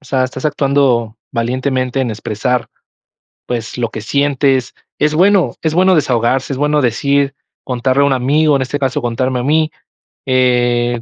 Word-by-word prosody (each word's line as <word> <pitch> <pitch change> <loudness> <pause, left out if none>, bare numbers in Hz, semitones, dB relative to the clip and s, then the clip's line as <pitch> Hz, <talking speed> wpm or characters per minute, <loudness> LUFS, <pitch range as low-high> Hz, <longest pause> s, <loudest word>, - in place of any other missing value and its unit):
o - - -24
sea, 130 -1 0
estás 130 +1 -4
actuando 135 -6 +1 0.2
valientemente 130 +2 -1
en 125 -3 -1
expresar, 110 +3 -2 0.8
pues, 120 0 -4
lo 120 -1 0
que 110 -1 -7
sientes 135 0 0 0.2
es 150 0 +1
bueno, 190 +3 +3
es 160 - 0
bueno 185 +3 +4
desahogarse, 130 -2 +1
es 130 - -4
bueno 150 +1 +1
decir, 140 +3 +1 0.3
contarle 130 +2 0
a - - +4
un 140 - +2
amigo, 145 +4 +2
en - - -1
este 130 +3 -3
caso, 140 +1 -1
contarme 125 +1 -1
a - - -2
mí, 155 +3 +1 0.6
eh, 120 -2 +1
130 Hz, 165 wpm, -16 LUFS, 120-145 Hz, 0.8 s, bueno